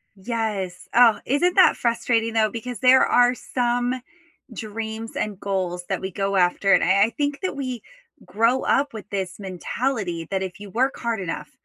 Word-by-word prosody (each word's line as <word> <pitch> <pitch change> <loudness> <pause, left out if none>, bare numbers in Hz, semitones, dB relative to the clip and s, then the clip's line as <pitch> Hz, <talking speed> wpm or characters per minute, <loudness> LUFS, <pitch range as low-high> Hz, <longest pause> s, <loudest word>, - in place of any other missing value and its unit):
Yes, 200 -4 -4
oh, 235 -3 +6
isn't 345 +8 +1
that 375 - +6
frustrating, 230 -1 0
though, 220 -1 +3
because 235 +1 -6
there 260 +1 +6
are 245 0 +4
some 245 +1 -1 0.5
dreams 220 +1 -6
and 205 -3 -3
goals 185 -3 -2
that 190 - -1
we 190 0 -4
go 195 +1 -2
after, 190 +2 +3
and - - +4
I 195 +3 +4
I - - -2
think 285 -1 -1
that 370 - -2
we 255 -4 -4 0.4
grow 230 +5 +1
up 280 -1 +1
with 210 -2 -9
this 190 -2 -4
mentality, 190 - -3
that 190 - 0
if 190 +1 -6
you 205 -1 -9
work 260 +6 0
hard 235 -2 -2
enough, 180 -3 -5
225 Hz, 175 wpm, -23 LUFS, 195-245 Hz, 0.5 s, oh